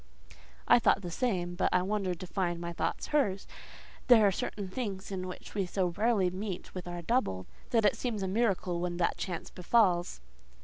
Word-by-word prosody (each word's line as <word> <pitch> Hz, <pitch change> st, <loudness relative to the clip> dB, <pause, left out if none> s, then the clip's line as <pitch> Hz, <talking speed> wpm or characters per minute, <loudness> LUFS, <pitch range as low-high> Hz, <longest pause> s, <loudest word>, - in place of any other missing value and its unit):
I -, -, +7 dB
thought 200 Hz, -3 st, +3 dB
the 175 Hz, -, -5 dB
same, 180 Hz, -5 st, -1 dB
but 175 Hz, -, +1 dB
I 180 Hz, -, +3 dB
wondered 190 Hz, -3 st, -1 dB
to -, -, -5 dB
find 175 Hz, -2 st, -1 dB
my 170 Hz, 0 st, -4 dB
thoughts -, -, -2 dB
hers: 200 Hz, -10 st, +1 dB, 0.6 s
there 230 Hz, -4 st, +7 dB
are 200 Hz, -, +5 dB
certain 195 Hz, +1 st, -4 dB
things 200 Hz, -2 st, -5 dB
in 185 Hz, -1 st, -3 dB
which 180 Hz, -, -9 dB
we 195 Hz, -3 st, -1 dB
so 185 Hz, 0 st, 0 dB
rarely 200 Hz, 0 st, +1 dB
meet 190 Hz, 0 st, -5 dB
with 180 Hz, -2 st, -6 dB
our 175 Hz, -1 st, -5 dB
double 160 Hz, -, 0 dB, 0.2 s
that 225 Hz, -3 st, +3 dB
it 205 Hz, -, +4 dB
seems 225 Hz, -6 st, -3 dB
a -, -, -1 dB
miracle 190 Hz, -4 st, 0 dB
when 175 Hz, 0 st, -2 dB
that 175 Hz, -, +1 dB
chance 175 Hz, -4 st, -5 dB
befalls. 180 Hz, -, +2 dB
190 Hz, 190 wpm, -31 LUFS, 175-210 Hz, 0.6 s, I